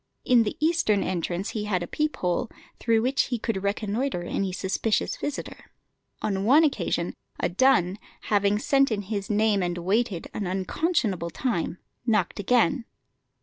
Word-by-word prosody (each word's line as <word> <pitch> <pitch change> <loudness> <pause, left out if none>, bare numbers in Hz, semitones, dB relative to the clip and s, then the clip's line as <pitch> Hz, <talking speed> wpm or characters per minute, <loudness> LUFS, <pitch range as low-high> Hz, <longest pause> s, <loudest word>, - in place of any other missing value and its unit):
In 245 -2 +5
the 215 - -2
eastern 310 -11 +2
entrance 180 +1 -2
he 210 -2 -3
had 185 -4 0
a - - -5
peep 305 - -1
hole, 180 +5 -1 0.3
through 225 -1 +2
which 270 +4 +2
he 245 - -2
could 215 -3 -2
reconnoitre 205 +1 -1
any 190 +2 -2
suspicious 190 +4 0
visitor. 290 -1 -5 0.6
On 195 -2 0
one 280 +9 +6
occasion 295 -3 0 0.3
a - - +1
dun, 215 -8 +3 0.2
having 205 0 +2
sent 275 +4 +2
in 205 -2 -1
his 200 -1 -4
name 210 -1 +2
and 175 -1 -1
waited 195 +1 0
an 200 - -3
unconscionable 190 - 0
time, 185 -4 -2 0.3
knocked 215 -6 +1
again. 245 +4 +2
210 Hz, 150 wpm, -26 LUFS, 190-245 Hz, 0.6 s, one